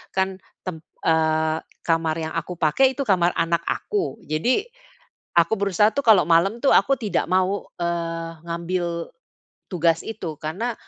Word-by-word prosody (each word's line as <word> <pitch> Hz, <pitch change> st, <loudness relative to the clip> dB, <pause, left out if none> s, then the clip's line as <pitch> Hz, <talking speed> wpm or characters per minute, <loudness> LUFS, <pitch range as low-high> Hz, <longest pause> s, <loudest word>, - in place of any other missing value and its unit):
kan 190 Hz, 0 st, 0 dB, 0.2 s
tem 180 Hz, -4 st, -5 dB, 0.2 s
eee, 160 Hz, -1 st, +2 dB, 0.3 s
kamar 165 Hz, -1 st, +1 dB
yang 160 Hz, 0 st, -4 dB
aku 180 Hz, +2 st, -3 dB
pakai 250 Hz, -, +3 dB
itu 275 Hz, -, -1 dB
kamar 180 Hz, -7 st, +2 dB
anak 165 Hz, 0 st, +1 dB
aku. 390 Hz, -, -2 dB
Jadi, 160 Hz, -, +1 dB, 0.7 s
aku 170 Hz, +4 st, +4 dB
berusaha 200 Hz, +1 st, +3 dB
tuh 280 Hz, -, -2 dB
kalau 215 Hz, -6 st, +7 dB
malam 175 Hz, +7 st, +4 dB
itu 275 Hz, -, +3 dB
aku 275 Hz, -, +4 dB
tidak 210 Hz, -3 st, 0 dB
mau, 185 Hz, +2 st, +1 dB, 0.2 s
eee, 165 Hz, -1 st, -2 dB
ngambil 170 Hz, 0 st, -3 dB, 0.6 s
tugas 170 Hz, -3 st, +2 dB
itu. 180 Hz, -8 st, -5 dB
Karena, 195 Hz, +11 st, -2 dB
170 Hz, 145 wpm, -23 LUFS, 165-200 Hz, 0.7 s, kalau